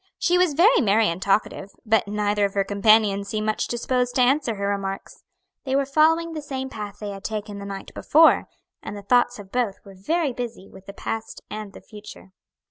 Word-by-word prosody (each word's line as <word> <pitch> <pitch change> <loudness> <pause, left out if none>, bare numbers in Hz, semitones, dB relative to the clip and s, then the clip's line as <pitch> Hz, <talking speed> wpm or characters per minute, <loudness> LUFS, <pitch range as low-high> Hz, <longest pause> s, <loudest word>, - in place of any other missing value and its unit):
She 350 - +1
was 355 -5 +2
very 385 - +5
merry 215 -1 +3
and 170 +2 -4
talkative, 200 0 -1
but 220 -1 +2
neither 205 0 0
of 200 - -4
her 200 - +2
companions 200 0 +3
seemed 215 -1 -2
much 215 0 -1
disposed 245 +1 -1
to 255 - +3
answer 255 -2 +1
her 200 0 -3
remarks. 195 -1 -4 0.4
They 265 -1 -1
were 275 0 +2
following 320 +4 +2
the 310 - -5
same 265 -2 -5
path 205 -3 -7
they 210 -1 -6
had 195 -1 -9
taken 210 -2 -5
the 200 - -7
night 195 -1 -8
before, 320 +2 +4 0.3
and 205 - -7
the 200 - -9
thoughts 245 +3 +2
of 200 -2 -12
both 240 -6 0
were 195 - -12
very 290 - -1
busy 235 -5 -6
with 190 - -16
the 200 - -8
past 225 +2 -6
and 210 -1 -6
the - - -12
future. 210 -3 -13
215 Hz, 210 wpm, -23 LUFS, 200-260 Hz, 0.4 s, very